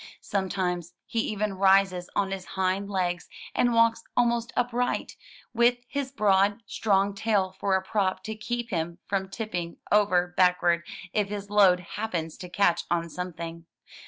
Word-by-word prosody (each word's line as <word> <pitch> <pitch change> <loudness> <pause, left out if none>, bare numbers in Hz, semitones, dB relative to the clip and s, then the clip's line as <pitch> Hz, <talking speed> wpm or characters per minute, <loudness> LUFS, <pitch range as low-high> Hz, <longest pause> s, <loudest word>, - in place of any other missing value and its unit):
Sometimes 180 -3 -2
he 230 - -2
even 210 -2 -2
rises 190 -2 +4
on 195 -1 +1
his 195 -1 -4
hind 190 +1 0
legs, 180 -3 -1 0.2
and 245 - +2
walks 230 0 +4
almost 235 -1 +2
upright, 245 0 -1 0.4
with 240 +1 +4
his 275 0 -3
broad, 205 -2 +2
strong 200 -1 +1
tail 200 -3 0
for 195 -1 +2
a 190 - 0
prop 190 -1 0
to 220 - -4
keep 235 +2 -4
him 170 -1 -2
from 190 -1 -2
tipping 180 -6 -4
over 185 -4 +3
back 180 -1 +3
ward 170 -1 +3 0.3
if 205 -2 +1
his 205 0 -6
load 190 -4 +5
happens 175 -4 -4
to 180 -3 -8
catch 175 -1 +2
on 170 -1 0
something. 170 -1 -6
195 Hz, 155 wpm, -27 LUFS, 180-215 Hz, 0.4 s, load